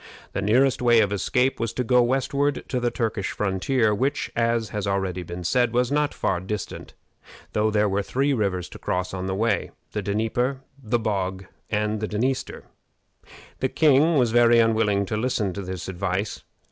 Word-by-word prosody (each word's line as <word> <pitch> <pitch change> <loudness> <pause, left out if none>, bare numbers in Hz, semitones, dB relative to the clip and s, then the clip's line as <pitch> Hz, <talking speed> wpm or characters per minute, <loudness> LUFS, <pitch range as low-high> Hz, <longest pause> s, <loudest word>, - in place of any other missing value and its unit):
The - - -2
nearest 125 +7 +3
way 120 -2 +5
of 105 -2 +2
escape 125 +6 +1
was 115 -1 -2
to 125 - -1
go 125 +1 +4
westward 135 +3 0
to 125 - 0
the 120 0 +1
Turkish 110 -4 -2
frontier, 105 +3 +1
which, 135 +6 -1
as 115 -1 +1
has 105 -1 -3
already 95 -2 -1
been 90 +1 -7
said, 120 +6 +1
was 125 +1 +1
not 150 0 +1
far 95 - -1
distant, 95 +2 -6 0.6
though 105 +1 +2
there 105 0 +2
were 100 +1 0
three 135 +8 0
rivers 100 -7 -1
to - - -11
cross 90 0 -2
on 95 0 -3
the 95 - -1
way 110 0 0 0.2
the 105 - -2
Dnieper, 115 +6 -1 0.2
the 120 0 0
Bog, 95 -4 -2 0.2
and 105 0 0
the 110 - -2
Dniester. 125 +6 -2 1.0
The 130 - 0
king 155 +3 +4
was 120 -4 +3
very 120 0 +5
unwilling 110 -3 +3
to 105 - -3
listen 110 -5 -1
to 100 - -5
this 95 -2 -6
advice. 95 +2 -2
110 Hz, 180 wpm, -24 LUFS, 100-125 Hz, 1.0 s, way